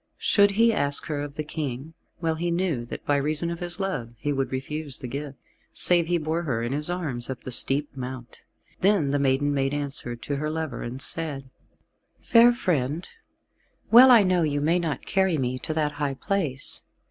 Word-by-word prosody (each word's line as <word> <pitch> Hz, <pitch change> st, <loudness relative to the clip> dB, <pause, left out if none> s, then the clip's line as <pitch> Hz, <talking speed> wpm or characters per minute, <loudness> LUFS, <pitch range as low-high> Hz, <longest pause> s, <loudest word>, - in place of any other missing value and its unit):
Should 205 Hz, -1 st, +4 dB
he 230 Hz, 0 st, +5 dB
ask 145 Hz, -6 st, 0 dB
her 150 Hz, -2 st, -3 dB
of 145 Hz, -1 st, -6 dB
the 155 Hz, -, -3 dB
King, 150 Hz, -1 st, -5 dB, 0.3 s
well 165 Hz, -1 st, 0 dB
he 170 Hz, +2 st, -2 dB
knew 170 Hz, -8 st, -1 dB
that -, -, -8 dB
by 145 Hz, -, +2 dB
reason 155 Hz, +4 st, 0 dB
of 170 Hz, -, -5 dB
his 175 Hz, +2 st, -2 dB
love 125 Hz, -12 st, -3 dB
he 145 Hz, +6 st, -2 dB
would 135 Hz, -1 st, -2 dB
refuse 140 Hz, +2 st, -4 dB
the 125 Hz, -, -7 dB
gift, 140 Hz, +2 st, -6 dB, 0.4 s
save 175 Hz, -2 st, +3 dB
he 175 Hz, 0 st, +2 dB
bore 160 Hz, +1 st, -2 dB
her 125 Hz, -8 st, -2 dB
in 120 Hz, -, -2 dB
his 150 Hz, +4 st, 0 dB
arms 150 Hz, -10 st, -3 dB
up 130 Hz, -, -6 dB
the 130 Hz, -, -5 dB
steep 140 Hz, +4 st, +1 dB
mount. 125 Hz, -2 st, -7 dB, 0.4 s
Then 190 Hz, -8 st, +2 dB
the 145 Hz, -, +1 dB
maiden 140 Hz, +1 st, +1 dB
made 135 Hz, 0 st, 0 dB
answer 140 Hz, -4 st, -4 dB
to 140 Hz, +4 st, -4 dB
her 150 Hz, +2 st, -2 dB
lover, 160 Hz, -1 st, -4 dB
and 125 Hz, +2 st, -5 dB
said, 140 Hz, -3 st, -5 dB, 0.7 s
"Fair 235 Hz, +1 st, +6 dB
friend, 160 Hz, -, -1 dB, 0.8 s
well 250 Hz, +3 st, +9 dB
I 235 Hz, -4 st, +8 dB
know 185 Hz, -2 st, +2 dB
you 145 Hz, -3 st, 0 dB
may 165 Hz, +5 st, +2 dB
not 155 Hz, -6 st, -3 dB
carry 190 Hz, -4 st, +1 dB
me 130 Hz, -1 st, -2 dB
to 155 Hz, -, -4 dB
that 150 Hz, -2 st, +1 dB
high 145 Hz, -2 st, -2 dB
place. 155 Hz, -6 st, -1 dB
150 Hz, 195 wpm, -25 LUFS, 135-170 Hz, 0.8 s, well